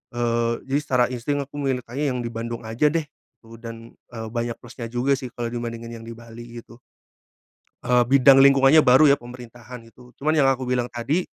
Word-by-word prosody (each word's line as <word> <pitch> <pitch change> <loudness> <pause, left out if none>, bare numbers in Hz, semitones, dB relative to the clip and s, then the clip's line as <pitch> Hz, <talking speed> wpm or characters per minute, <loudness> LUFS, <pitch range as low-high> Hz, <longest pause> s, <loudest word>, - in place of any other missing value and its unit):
Eee, 120 -1 0
jadi 135 +2 +1
secara 130 -4 +1
insting 135 +4 -2
aku 140 +1 -16
mintanya 135 +1 -2
yang 125 - -3
di - - -2
Bandung 115 0 -6
aja 115 +7 +1
deh, 165 0 -1 0.4
eee, 115 +1 -13
dan, 115 0 -10 0.2
eee, 115 -2 -7
banyak 120 -1 -3
plusnya 120 -1 -9
juga 125 +3 +1
sih 130 -2 -7
kalau 120 -1 -5
dibandingin 115 -1 -6
yang - - -12
di - - -7
Bali 120 0 -11
gitu. 115 - -17 1.1
Eee, 125 0 +3
bidang 135 +2 +6
lingkungannya 140 +2 +6
baru 130 +5 +6
ya 140 - +6
pemerintahan 120 -1 -12
gitu 125 +2 -18
cuman 155 +3 0
yang 145 -3 +3
aku 130 -1 -3
bilang 125 -1 -1
tadi, 125 +9 -1
125 Hz, 190 wpm, -23 LUFS, 115-135 Hz, 1.1 s, bidang